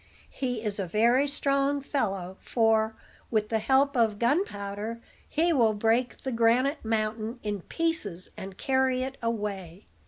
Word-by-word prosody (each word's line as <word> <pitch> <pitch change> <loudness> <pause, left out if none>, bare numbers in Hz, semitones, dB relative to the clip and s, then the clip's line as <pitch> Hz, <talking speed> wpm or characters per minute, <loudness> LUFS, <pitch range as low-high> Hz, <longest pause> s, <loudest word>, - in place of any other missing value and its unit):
He 245 -4 -3
is 210 -2 -1
a 190 - -2
very 235 +9 +3
strong 280 0 +1
fellow; 195 -10 -2
for, 220 -1 +2 0.3
with 215 -2 0
the 225 - +1
help 270 +5 +3
of 225 -4 +2
gunpowder, 225 - -1 0.3
he 335 +2 +2
will 230 -6 +3
break 230 +4 +1
the 265 - -2
granite 245 +5 +2
mountain 220 +1 -2
in 205 -2 -3
pieces, 220 - -2
and 190 0 -8
carry 260 -1 +1
it 270 +1 -5
away. 205 -6 -4
230 Hz, 145 wpm, -28 LUFS, 210-265 Hz, 0.3 s, very